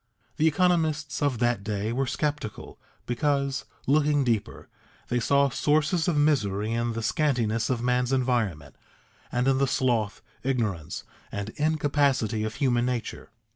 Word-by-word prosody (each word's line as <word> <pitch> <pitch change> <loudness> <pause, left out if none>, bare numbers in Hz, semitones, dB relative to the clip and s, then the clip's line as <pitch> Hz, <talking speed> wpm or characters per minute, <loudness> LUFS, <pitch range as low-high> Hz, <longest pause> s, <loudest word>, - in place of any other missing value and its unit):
The 155 - +3
economists 155 -3 +1
of 140 -4 +1
that 120 -3 +1
day 105 +1 -2
were 135 +2 0
sceptical, 145 -4 -3 0.3
because, 140 +2 0 0.2
looking 145 0 +3
deeper, 115 -4 -2 0.4
they 120 - +1
saw 140 +3 +3
sources 155 +5 +1
of 170 -4 +1
misery 110 -9 +1
in 115 0 -1
the 115 0 -4
scantiness 115 -6 +1
of 120 -2 -1
man's 125 0 +1
environment, 120 - 0 0.6
and 125 +1 0
in 135 -1 +3
the 140 - +3
sloth, 120 -5 0 0.2
ignorance, 110 - -2 0.3
and 100 +1 -4
incapacity 140 -6 +1
of 110 0 -3
human 125 -3 +1
nature. 125 -2 -4
125 Hz, 135 wpm, -26 LUFS, 115-145 Hz, 0.6 s, The